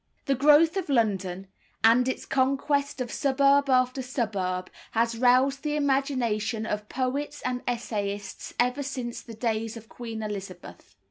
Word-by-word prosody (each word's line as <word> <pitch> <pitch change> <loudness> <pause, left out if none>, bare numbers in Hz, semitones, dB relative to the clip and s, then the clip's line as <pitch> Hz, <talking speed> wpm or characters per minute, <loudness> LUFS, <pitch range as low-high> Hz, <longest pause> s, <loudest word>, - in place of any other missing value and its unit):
The 275 - +2
growth 300 +6 +5
of 370 -5 -3
London, 195 -7 0 0.4
and 235 +3 +5
its - - -4
conquest 275 +1 0
of 245 - -3
suburb 280 +1 +3
after 255 0 +2
suburb, 195 -8 -2 0.2
has 230 0 +1
roused 255 +3 +3
the 300 -1 -1
imagination 255 -6 0
of 210 -1 -4
poets 280 +3 -2
and 250 -1 -1
essayists 205 -4 -3
ever 250 +3 +2
since 255 -4 -4
the 230 - -11
days 225 0 -2
of 225 0 -12
Queen 225 -2 -6
Elizabeth. 195 -4 -8
250 Hz, 140 wpm, -27 LUFS, 220-275 Hz, 0.4 s, growth